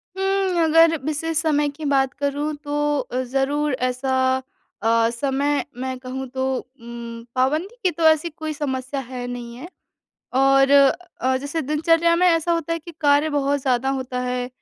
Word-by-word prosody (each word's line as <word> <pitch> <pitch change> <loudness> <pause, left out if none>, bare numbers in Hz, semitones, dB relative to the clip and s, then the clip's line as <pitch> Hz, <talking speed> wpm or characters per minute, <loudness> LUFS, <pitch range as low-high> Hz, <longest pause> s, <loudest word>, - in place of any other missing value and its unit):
उम्म, 385 -2 +1
अगर 325 +1 +5
विशेष 310 +1 -2
समय 295 -2 +1
की 295 +2 -8
बात 270 -2 +2
करूँ 285 +2 -2
तो 295 0 0
अ, 255 -1 -3
ज़रूर 275 +3 0 0.2
ऐसा 255 +1 -2 0.7
अ, 230 +1 +3
समय 280 +4 0
मैं 260 0 -4
कहूँ 260 +1 -6
तो 260 +1 -2
उम, 235 -2 -9
पाबंदी 305 - 0
की 365 - +3
तो 335 0 -4
ऐसी 315 +1 +3
कोई 310 0 -5
समस्या 270 -2 -3
है 250 -1 -6
नहीं 240 -1 -7
है। 260 +7 -9 0.7
और 270 +1 +4
अ 280 -1 +7 0.3
अ, 260 0 +1
जैसे 285 +5 -3
दिनचर्या 330 +4 +2
में 365 +1 +3
ऐसा 335 -1 +3
होता 335 -1 -1
है 330 - -1
कि 335 +1 -11
कार्य 290 +1 +4
बहुत 285 -1 0
ज़्यादा 255 0 +1
होता 260 -2 -2
है, 250 0 -2
285 Hz, 170 wpm, -22 LUFS, 260-315 Hz, 0.7 s, अ